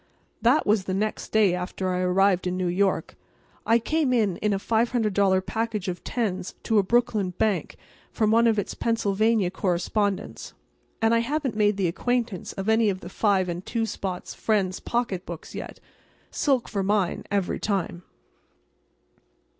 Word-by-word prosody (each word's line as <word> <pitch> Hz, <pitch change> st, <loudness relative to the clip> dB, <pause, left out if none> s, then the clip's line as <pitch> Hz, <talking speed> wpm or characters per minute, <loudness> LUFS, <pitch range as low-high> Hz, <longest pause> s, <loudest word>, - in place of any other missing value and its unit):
That 245 Hz, +7 st, +4 dB
was 205 Hz, -2 st, +2 dB
the 185 Hz, -, -2 dB
next 215 Hz, +2 st, -2 dB
day 210 Hz, -4 st, +4 dB
after 180 Hz, +1 st, -3 dB
I 180 Hz, -, -1 dB
arrived 185 Hz, 0 st, +2 dB
in 180 Hz, 0 st, -1 dB
New 185 Hz, -, -1 dB
York. 190 Hz, +2 st, 0 dB, 0.5 s
I 230 Hz, -, +5 dB
came 295 Hz, +3 st, 0 dB
in 210 Hz, -7 st, +2 dB
a 210 Hz, -, +1 dB
$500 210 Hz, -4 st, +1 dB
package 220 Hz, -4 st, -2 dB
of 180 Hz, -1 st, -4 dB
tens 195 Hz, -6 st, -2 dB
to 220 Hz, -2 st, +3 dB
a -, -, +3 dB
Brooklyn 210 Hz, -4 st, +1 dB
bank 210 Hz, -4 st, 0 dB, 0.4 s
from 215 Hz, -2 st, +1 dB
one 230 Hz, +1 st, +5 dB
of 225 Hz, -1 st, +2 dB
its 205 Hz, -, -2 dB
Pennsylvania 215 Hz, -3 st, +1 dB
correspondents—and 200 Hz, +4 st, -2 dB
I 230 Hz, -, +4 dB
haven't 270 Hz, 0 st, -1 dB
made 210 Hz, -1 st, +2 dB
the 190 Hz, -3 st, +1 dB
acquaintance 230 Hz, +2 st, -2 dB
of 195 Hz, +1 st, -5 dB
any 220 Hz, -1 st, +4 dB
of 190 Hz, -1 st, -3 dB
the 175 Hz, -, -8 dB
five 195 Hz, -2 st, +1 dB
and 175 Hz, +1 st, -4 dB
two 230 Hz, +2 st, -1 dB
spot's 190 Hz, -4 st, -5 dB
friends' 195 Hz, -4 st, 0 dB
pocketbooks 190 Hz, -8 st, -3 dB
yet. -, -, -7 dB, 0.5 s
Silk 270 Hz, -5 st, +1 dB
for 200 Hz, -, -2 dB
mine, 195 Hz, -2 st, 0 dB
every 200 Hz, -3 st, -1 dB
time. 195 Hz, -4 st, -2 dB
205 Hz, 155 wpm, -25 LUFS, 185-225 Hz, 0.5 s, I